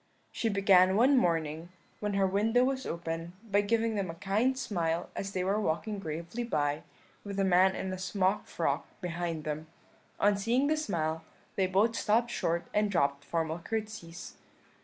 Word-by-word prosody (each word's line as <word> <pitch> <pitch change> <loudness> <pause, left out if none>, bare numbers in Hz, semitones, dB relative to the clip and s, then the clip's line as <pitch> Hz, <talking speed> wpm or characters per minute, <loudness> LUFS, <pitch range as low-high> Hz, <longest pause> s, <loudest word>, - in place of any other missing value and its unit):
"She 225 - -1
began 195 -2 +5
one 255 +6 +5
morning, 165 - 0 0.3
when 210 -1 -2
her 195 -1 +3
window 215 +6 +2
was 265 0 -1
open, 165 0 -4 0.2
by 205 +1 +4
giving 225 +2 +1
them 200 -4 -2
a 165 - -6
kind 210 +8 +1
smile 170 -8 -1
as 195 - -4
they 185 - -1
were 200 +3 +1
walking 205 +4 -1
gravely 170 +7 -4
by, 150 -9 0 0.4
with 200 -1 -5
a - - +3
man 190 0 +4
in 190 0 -3
a 185 - -5
smock 190 +1 0
frock - - -1
behind 175 -3 -3
them. 155 +1 -4 0.5
On 205 0 +4
seeing 230 +7 +1
this 305 +1 +1
smile 160 -3 -1 0.3
they 190 -1 +2
both 205 +5 +2
stopped 235 +3 +2
short 170 -6 -1
and 210 0 +2
dropped 140 -7 +1
formal 165 +1 -2
curtseys. 210 -4 -5
190 Hz, 170 wpm, -30 LUFS, 170-215 Hz, 0.5 s, began